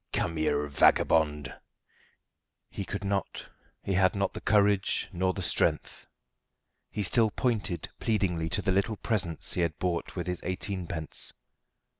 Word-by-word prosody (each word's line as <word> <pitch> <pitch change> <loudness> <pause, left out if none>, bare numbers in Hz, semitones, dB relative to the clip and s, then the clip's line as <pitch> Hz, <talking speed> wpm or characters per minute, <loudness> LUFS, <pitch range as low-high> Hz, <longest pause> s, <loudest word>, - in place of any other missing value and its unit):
"Come 80 -2 -1
here, 75 -1 +1
vagabond!" 75 0 +3 1.2
He 100 - -5
could 100 +1 -5
not; 100 0 -2 0.4
he 100 - -1
had 95 +1 +3
not 100 0 0
the - - -7
courage 100 -2 +2
nor 95 +1 +1
the 95 0 -5
strength. - - 0 0.8
He 105 - -3
still 110 +4 +3
pointed 110 -5 -1
pleadingly 90 -7 0
to 100 - 0
the 95 - +1
little 100 +3 +1
presents 95 -9 +1
he 90 - 0
had 85 -3 -1
bought 90 -2 -2
with 90 - -3
his 90 -1 -3
eighteenpence. 90 -3 -3
95 Hz, 140 wpm, -29 LUFS, 85-100 Hz, 1.2 s, vagabond